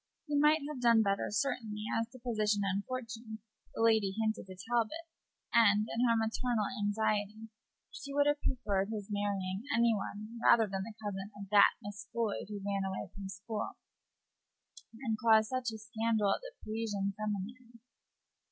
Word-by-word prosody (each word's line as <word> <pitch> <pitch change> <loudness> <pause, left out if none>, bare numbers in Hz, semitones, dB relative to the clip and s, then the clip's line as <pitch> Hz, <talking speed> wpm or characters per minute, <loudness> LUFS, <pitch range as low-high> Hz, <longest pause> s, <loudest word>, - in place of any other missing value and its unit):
He 295 -2 -2
might 300 +2 +5
have 295 -4 -5
done 230 -2 +6
better, 200 -1 0
certainly, 215 -2 -1
as 230 0 0
to 255 - -13
position 215 -4 0
and 195 +1 0
fortune, 230 -3 -5 0.4
the 225 - 0
lady 220 -4 +3
hinted 220 -2 -1
to 185 -1 -10
Talbot; 240 +8 0 0.5
and, 215 -2 +5
in 240 +2 +2
her 230 - +4
maternal 225 0 0 0.2
anxiety, 215 +1 0 0.4
she 280 - -8
would 285 +1 +3
have 290 0 +2
preferred 200 -5 0
his 210 -2 -5
marrying 200 -2 -1 0.2
any 235 0 +5
one 215 +2 -5
rather 225 -1 +6
than 195 -2 -3
the 215 +2 -7
cousin 195 -1 -4
of 200 -1 -7
that 205 -1 +7
Miss 205 +1 -7
Floyd, 230 -3 -1
who 205 -2 -6
ran 200 -1 0
away 190 0 -4
from 195 -1 -7
school 210 +4 -5 1.3
and 220 -3 -1
caused 220 -1 +5
such 255 -2 -1
a 220 - -6
scandal 220 -1 0
at - - -3
the - - -9
Parisian 210 -3 -2
seminary. 215 +4 -5
220 Hz, 165 wpm, -33 LUFS, 205-235 Hz, 1.3 s, that